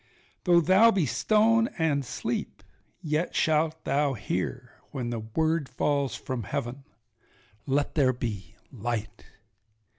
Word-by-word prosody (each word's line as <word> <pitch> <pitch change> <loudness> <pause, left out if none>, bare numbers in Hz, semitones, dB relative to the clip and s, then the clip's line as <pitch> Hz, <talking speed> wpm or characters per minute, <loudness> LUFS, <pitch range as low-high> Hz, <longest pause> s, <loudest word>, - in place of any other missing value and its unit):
Though 175 -2 +5
thou 190 +7 +6
be 195 -7 +2
stone 225 - +3
and 150 -4 +1
sleep, 120 - -4 0.4
yet 155 +2 -1
shalt 160 0 +1
thou 145 -1 +1
hear 115 - -4 0.2
When 120 -3 -4
the 115 - -2
word 155 +7 -1
falls 140 -2 0
from 130 -2 -4
heaven—Let 120 0 -5
there 135 -5 +3
be 105 -5 -5 0.2
light. 115 -2 -4
140 Hz, 115 wpm, -27 LUFS, 120-160 Hz, 0.4 s, thou